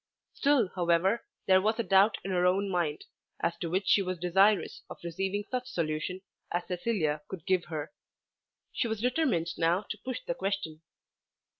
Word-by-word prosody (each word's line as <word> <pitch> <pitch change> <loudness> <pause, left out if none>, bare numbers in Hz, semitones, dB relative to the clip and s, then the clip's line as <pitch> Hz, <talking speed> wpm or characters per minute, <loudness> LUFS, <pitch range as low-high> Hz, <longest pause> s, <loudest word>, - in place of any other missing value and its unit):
Still 275 -8 +3
however 180 +5 +2 0.2
there 190 -1 +5
was 220 +3 +1
a 235 - 0
doubt 195 +1 +4
in 195 - -3
her 180 -1 +2
own 190 +2 +2
mind, 165 -4 -1 0.3
as 170 - 0
to 170 - -3
which 185 +3 -1
she 200 - +5
was 185 -1 -2
desirous 190 +4 +3
of - - -8
receiving 190 +4 -2
such 250 0 -2
solution 165 +3 -2 0.3
as 175 0 -1
Cecilia 175 -5 -1
could 185 -4 -8
give 185 -2 +2
her. 155 -3 -5 0.8
She 235 - 0
was 220 -2 -2
determined 245 - +1
now 170 +4 +2
to 210 - -6
push 255 -1 -4
the - - -1
question. 195 -9 -3
190 Hz, 170 wpm, -30 LUFS, 170-210 Hz, 0.8 s, there